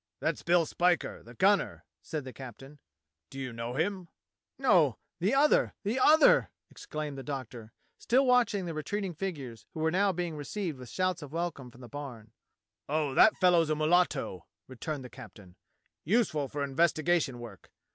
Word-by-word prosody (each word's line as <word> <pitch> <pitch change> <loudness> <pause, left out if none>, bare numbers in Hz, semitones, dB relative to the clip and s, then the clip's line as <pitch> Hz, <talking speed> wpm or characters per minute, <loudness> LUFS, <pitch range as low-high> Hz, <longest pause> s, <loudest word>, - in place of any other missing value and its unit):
"That's - - -1
Bill 170 -1 +3
Spiker 175 +2 0
the 120 +1 -14
gunner," 200 - +2 0.2
said 155 -3 -5
the 130 -1 -9
captain. 135 +3 -11 0.5
"Do - - -11
you 130 -3 -5
know 115 +2 -5
him?" 180 +3 -1 0.5
"No 180 - +3
— - - -57
the 195 +9 +1
other, 295 +2 +3
the 220 +6 -1
other," 310 +4 +6 0.2
exclaimed 150 -2 -6
the - - -5
Doctor, 130 -5 -7 0.3
still 265 +3 +3
watching 240 -6 +3
the 170 - -4
retreating 185 +5 -3
figures 140 - -6
who - - -5
were 160 0 +2
now 195 +3 +3
being 175 -3 -3
received 150 +1 -4
with 125 -2 -10
shouts 185 -2 -1
of 145 -2 -9
welcome 165 -6 -3
from 120 +1 -17
the 120 - -10
barn. 125 -6 -8 0.6
"Oh, 150 -2 0
that 215 - +6
fellow's 175 -4 +4
a 155 - +2
mulatto," 155 - +1 0.2
returned 135 +2 -5
the - - -7
captain; 95 -7 -13 0.5
"useful 170 - +1
for 145 +1 -4
investigation 155 0 +1
work. 120 -5 -11
155 Hz, 165 wpm, -30 LUFS, 130-180 Hz, 0.6 s, other